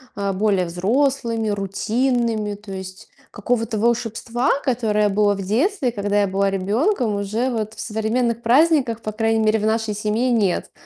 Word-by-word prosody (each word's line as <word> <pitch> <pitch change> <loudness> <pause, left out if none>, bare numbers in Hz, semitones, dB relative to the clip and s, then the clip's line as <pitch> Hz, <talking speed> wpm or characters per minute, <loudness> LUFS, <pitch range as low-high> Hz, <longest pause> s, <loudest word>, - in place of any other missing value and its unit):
а, 200 -1 -2
более 195 -2 +1
взрослыми, 230 +5 0
рутинными. 215 +2 -1
То 205 0 -12
есть 190 0 -8 0.2
какого-то 225 +1 -2
волшебства, 235 +2 0
которое 215 -5 +1
было 205 0 +2
в 195 - -5
детстве, 260 - 0
когда 205 -2 0
я 200 - +2
была 195 +1 +1
ребенком, 215 - 0
уже 220 +6 -1
вот 220 -1 -3
в - - -14
современных 225 +2 -1
праздниках, 255 -2 +3
по 215 - -4
крайней 225 +1 0
мере, 220 0 +2
в 215 - -2
нашей 220 -1 0
семье, 215 +4 0
нет. 205 -6 0
220 Hz, 155 wpm, -21 LUFS, 205-240 Hz, 0.2 s, праздниках